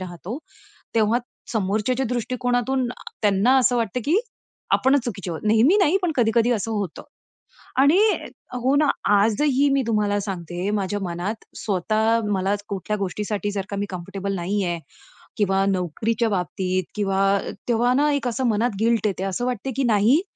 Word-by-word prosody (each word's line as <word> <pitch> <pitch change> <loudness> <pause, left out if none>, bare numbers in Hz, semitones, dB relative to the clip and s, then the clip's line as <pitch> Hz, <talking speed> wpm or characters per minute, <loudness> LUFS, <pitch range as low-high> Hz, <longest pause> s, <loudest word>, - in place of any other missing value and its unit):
राहतो. 185 +6 -6 0.6
तेव्हा 225 +1 +3 0.3
समोरच्याच्या 220 +5 0
दृष्टिकोनातून 245 +1 0
अ, - - -7 0.3
त्यांना 210 +5 +4
असं 250 -1 +3
वाटतं, 230 +1 -1
की 320 +5 +3 0.6
आपणच 265 -1 +3
चुकीचे 195 -6 -4
आहोत. 160 - -4
नेहमी 230 - +5
नाही 375 -1 +4
पण 345 -3 +1
कधी-कधी 235 0 +3
असं 225 -1 -2
होतं 200 -6 -3 0.8
आणि 290 +6 +5 0.7
हो 265 +2 +3
ना, 300 - +3 0.3
आजही 255 +7 +3
मी 275 0 +3
तुम्हाला 210 -2 +1
सांगते 180 -1 -4
माझ्या 205 0 -1
मनात 180 +5 -4
स्वतः 220 +3 +1
मला 195 0 +1 0.2
कुठल्या 200 +2 -2
गोष्टीसाठी 205 +2 -2
जर 200 -2 -3
का 200 - -4
मी 205 - -1
कम्फर्टेबल 195 +2 -4
नाही 190 +3 -1
आहे 175 -1 -2 0.6
किंवा 195 -2 +2
नोकरीच्या 205 +6 0
बाबतीत 185 -1 -1
किंवा 195 -2 0 0.5
तेव्हा 240 +1 +3
ना 295 +2 +3
एक 275 -3 -1
असं 245 +2 -2
मनात 225 0 +1
गिल्ट 225 -2 +2
येते. 190 -2 -2
असं 195 +6 -2
वाटते, 250 +1 -2
की 275 - +1
नाही 230 - +4
215 Hz, 155 wpm, -23 LUFS, 195-245 Hz, 0.8 s, नेहमी